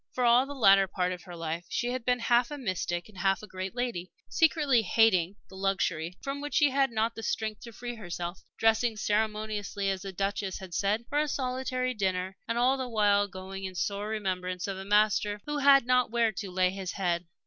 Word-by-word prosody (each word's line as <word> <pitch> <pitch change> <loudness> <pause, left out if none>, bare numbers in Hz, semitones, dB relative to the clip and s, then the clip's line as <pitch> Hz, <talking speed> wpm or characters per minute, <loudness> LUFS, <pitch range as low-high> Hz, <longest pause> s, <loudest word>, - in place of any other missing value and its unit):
For 250 - -1
all 245 +2 +5
the 285 - -7
latter 195 -6 +6
part 180 -1 -1
of 180 -1 -5
her 175 -2 -9
life 165 0 -4
she 240 +1 -1
had 255 -1 -3
been 250 +1 +2
half 240 +1 +2
a 295 - -5
mystic 185 -7 -2
and 205 -3 -13
half 195 +2 +1
a - - -8
great 185 +2 -6
lady, 235 -8 -3 0.2
secretly 300 -6 +3
hating 195 -3 +3
the 190 - -14
luxury 185 -3 -1
from 275 +1 -4
which 290 0 -4
she 295 -4 +4
had 270 0 +2
not 225 0 0
the 225 - -7
strength 220 -1 -2
to 235 - -9
free 240 +2 -6
herself, 175 -4 -5 0.2
dressing 225 0 +2
ceremoniously, 210 -2 -1
as 190 -1 -3
the 195 0 -6
Duchess 195 0 -2
had 185 -2 -10
said, 205 +6 0
for 290 - 0
a 305 - +1
solitary 255 -1 -2
dinner, 190 -3 -1
and 230 - -1
all 255 +3 +3
the 260 -1 -4
while 205 -2 +3
going 190 0 -8
in 190 -1 -5
sore 200 +4 -2
remembrance 185 -4 -2
of 195 - -3
a - - -6
Master 210 0 +2
who 295 0 -2
"had 275 -2 +6
not 250 0 +3
where 230 -1 +2
to 200 -1 -6
lay 185 0 +2
his 190 -2 -5
head." 175 -3 -1
210 Hz, 215 wpm, -29 LUFS, 190-245 Hz, 0.2 s, latter